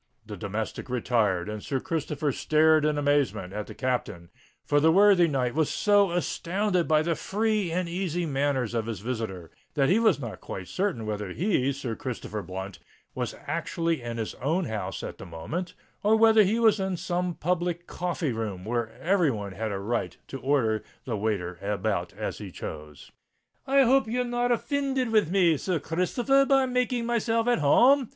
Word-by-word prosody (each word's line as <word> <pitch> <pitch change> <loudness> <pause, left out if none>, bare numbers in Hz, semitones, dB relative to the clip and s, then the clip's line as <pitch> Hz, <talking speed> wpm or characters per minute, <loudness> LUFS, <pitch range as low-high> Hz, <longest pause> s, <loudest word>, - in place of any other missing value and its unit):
The 105 -1 -7
domestic 105 +6 -4
retired, 110 -7 +1
and 105 0 -5
Sir 135 +4 -2
Christopher 150 -1 -2
stared 155 +2 +3
in 150 -1 +1
amazement 145 -10 +1
at 105 0 -4
the - - -9
Captain; 105 -9 -3 0.3
for 145 - +3
the 160 +2 +5
worthy 195 -1 +6
knight 130 -5 0
was 155 -1 +1
so 205 -2 +3
astounded 180 +1 0
by 155 -1 +3
the 170 +1 +1
free 210 0 -1
and 180 +1 -1
easy 175 -1 -2
manners 135 -5 0
of 115 -1 -1
his 110 -5 -4
visitor, 110 -8 -4 0.2
that 140 -3 +3
he 200 - +4
was 225 -8 +3
not 120 -5 -7
quite 90 -2 -7
certain 185 - -2
whether 105 -2 -3
he, 140 - +1
Sir 130 -4 -4
Christopher 110 -4 -5
Blunt, 95 0 -7 0.3
was - - -3
actually 165 -3 -1
in 120 -1 -5
his 110 -2 -3
own 165 +7 +1
house 100 -6 -4
at - - -7
the - - -8
moment, 150 - -5 0.3
or 215 +2 +4
whether 220 0 +6
he 210 +3 +2
was 225 -3 +4
in 190 -1 -1
some 180 -1 -2
public 175 0 -1
coffee 175 -6 -2
room 105 -5 -4
where 115 0 -1
every 180 0 +3
one 105 -5 -4
had 110 +2 -3
a 100 - -2
right 100 -3 -2
to 135 - -6
order 125 -6 +1 0.2
the 120 - -2
waiter 100 -5 -2
about 100 0 -1
as - - -5
he - - -7
chose. 75 -2 -9 0.6
"I 275 0 +5
hope 265 -1 +4
you're 250 +3 0
not 245 0 0
offinded 265 -1 0
with 215 -7 +3
me, 175 -4 +3
Sir 180 +2 -1
Christopher 180 - 0
r, 275 - +6
by 270 -1 +4
making 250 -1 0
myself 230 0 0
at 245 - +3
home?" 250 - +5
155 Hz, 185 wpm, -27 LUFS, -, 0.6 s, worthy